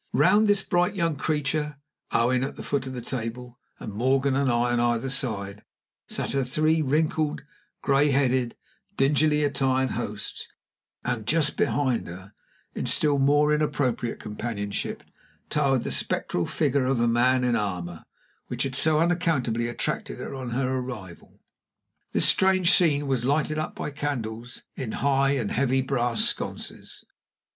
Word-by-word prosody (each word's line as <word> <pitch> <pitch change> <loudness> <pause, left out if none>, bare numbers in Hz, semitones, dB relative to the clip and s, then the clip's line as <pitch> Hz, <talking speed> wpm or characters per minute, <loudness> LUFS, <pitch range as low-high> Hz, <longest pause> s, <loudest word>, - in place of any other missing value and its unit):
Round 190 - +4
this 205 -2 +3
bright 175 +2 +1
young 165 -4 0
creature 150 0 -1 0.3
(Owen, 125 +2 +2
at 135 - -4
the - - -8
foot 140 -2 -2
of 130 - -6
the 125 -2 -6
table, 125 0 -5 0.2
and 105 - -7
Morgan 130 +4 +1
and 140 -1 +1
I 120 0 +1
on 120 - +1
either 120 +2 0
side) 105 -7 -1 0.5
sat - - -2
her 135 -1 +1
three 155 +5 +1
wrinkled, 155 +1 0 0.4
gray 140 +1 +3
headed, 130 -3 +1 0.4
dingily 150 +2 +3
attired 130 -2 +1
hosts, - - -5 0.6
and 120 -4 -2
just 150 +1 +2
behind 130 -5 0
her, 95 +4 -10 0.4
in - - -3
still 145 -2 +2
more 145 +2 +4
inappropriate 140 -6 -1
companionship, 105 -2 -4 0.5
towered 135 -4 +2
the - - -3
spectral 85 - 0
figure 140 -3 +1
of 130 0 +1
the 120 0 +2
man 125 +2 +3
in 125 -1 +2
armor, 90 -5 -3 0.4
which - - -2
had 135 - -3
so 155 +4 +4
unaccountably 160 -9 +1
attracted 120 - -2
her - - -6
on 130 -2 -5
her 130 +2 -1
arrival. 105 -9 -9 0.7
This - - +4
strange 190 -1 +4
scene 145 -5 +3
was 135 -3 0
lighted 150 +3 +1
up 155 - -4
by - - -4
candles 120 -5 -5
in 125 -5 -5
high 140 0 +2
and 120 -7 -2
heavy 130 0 +1
brass 120 -3 +1
sconces. - - -4
135 Hz, 150 wpm, -25 LUFS, 120-150 Hz, 0.7 s, Round